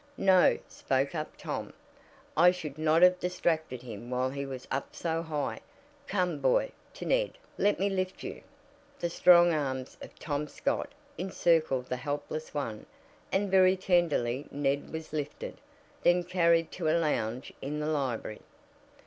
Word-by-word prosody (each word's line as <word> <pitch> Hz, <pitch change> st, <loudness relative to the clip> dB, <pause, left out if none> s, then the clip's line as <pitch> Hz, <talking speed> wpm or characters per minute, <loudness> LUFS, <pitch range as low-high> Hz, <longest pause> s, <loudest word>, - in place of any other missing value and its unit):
"No," 190 Hz, -2 st, +5 dB
spoke 135 Hz, +2 st, -1 dB
up 155 Hz, -2 st, -5 dB
Tom, -, -, -5 dB, 0.6 s
"I 175 Hz, +3 st, +7 dB
should 160 Hz, -5 st, -4 dB
not 160 Hz, +2 st, +4 dB
have 180 Hz, 0 st, +6 dB
distracted 160 Hz, -8 st, -1 dB
him 115 Hz, -1 st, -8 dB
while 130 Hz, +1 st, 0 dB
he 140 Hz, 0 st, -4 dB
was 130 Hz, -2 st, -7 dB
up 135 Hz, +1 st, -3 dB
so 165 Hz, -1 st, -1 dB
high. 155 Hz, -3 st, -3 dB, 0.5 s
Come, 180 Hz, -3 st, 0 dB
boy," -, -, +2 dB, 0.2 s
to -, -, -7 dB
Ned, -, -, +1 dB, 0.2 s
"let 205 Hz, +1 st, +2 dB
me 195 Hz, -, +2 dB
lift 185 Hz, -1 st, -2 dB
you." -, -, -6 dB, 0.6 s
The 170 Hz, -, -2 dB
strong 175 Hz, -1 st, +6 dB
arms 130 Hz, -4 st, -3 dB
of -, -, -11 dB
Tom 150 Hz, -1 st, -3 dB
Scott 280 Hz, -, -2 dB, 0.3 s
encircled 165 Hz, -8 st, +1 dB
the 125 Hz, -, -3 dB
helpless 145 Hz, +3 st, -4 dB
one, 115 Hz, -8 st, -4 dB, 0.4 s
and 195 Hz, 0 st, 0 dB
very 185 Hz, 0 st, +5 dB
tenderly 160 Hz, -9 st, +1 dB
Ned 140 Hz, 0 st, -1 dB
was 160 Hz, -1 st, -7 dB
lifted, 150 Hz, -1 st, -4 dB, 0.4 s
then 175 Hz, 0 st, +4 dB
carried 170 Hz, -2 st, +2 dB
to 165 Hz, -4 st, -1 dB
a 160 Hz, -, +3 dB
lounge 130 Hz, -7 st, -1 dB
in 150 Hz, +3 st, -3 dB
the 150 Hz, -, -2 dB
library. 135 Hz, -8 st, -2 dB
155 Hz, 150 wpm, -30 LUFS, 140-180 Hz, 0.6 s, I